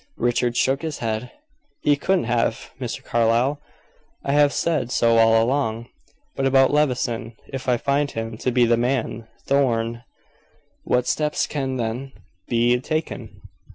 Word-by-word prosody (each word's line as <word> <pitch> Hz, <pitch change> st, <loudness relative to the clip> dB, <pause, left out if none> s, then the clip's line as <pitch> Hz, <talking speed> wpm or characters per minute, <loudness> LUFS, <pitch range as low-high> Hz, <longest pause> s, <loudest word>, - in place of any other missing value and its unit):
Richard 120 Hz, 0 st, 0 dB
shook 135 Hz, +1 st, +2 dB
his 160 Hz, -2 st, -4 dB
head. 115 Hz, +1 st, -3 dB, 0.5 s
"He 145 Hz, -, +3 dB
couldn't 185 Hz, +6 st, +1 dB
have, 120 Hz, 0 st, -1 dB
Mr. -, -, -4 dB
Carlyle; 120 Hz, +5 st, +1 dB, 0.6 s
I 140 Hz, -, 0 dB
have 145 Hz, 0 st, +4 dB
said 150 Hz, -8 st, 0 dB
so 115 Hz, -1 st, +3 dB
all 115 Hz, 0 st, +5 dB
along. 115 Hz, -3 st, -1 dB, 0.5 s
But 135 Hz, -, +1 dB
about 135 Hz, +1 st, +4 dB
Levison. 125 Hz, -6 st, 0 dB, 0.2 s
If 135 Hz, -1 st, -3 dB
I 125 Hz, -, +3 dB
find 140 Hz, +3 st, 0 dB
him 115 Hz, -2 st, -5 dB
to 125 Hz, -, 0 dB
be 125 Hz, 0 st, +4 dB
the 120 Hz, 0 st, +3 dB
man 120 Hz, -2 st, -1 dB, 0.2 s
Thorn, 120 Hz, -4 st, +1 dB, 0.8 s
what 125 Hz, 0 st, +1 dB
steps 150 Hz, -1 st, 0 dB
can 135 Hz, -3 st, -3 dB
then 125 Hz, +3 st, -3 dB, 0.3 s
be 120 Hz, +1 st, +2 dB
taken?" 155 Hz, +5 st, -4 dB
125 Hz, 145 wpm, -23 LUFS, 115-140 Hz, 0.8 s, all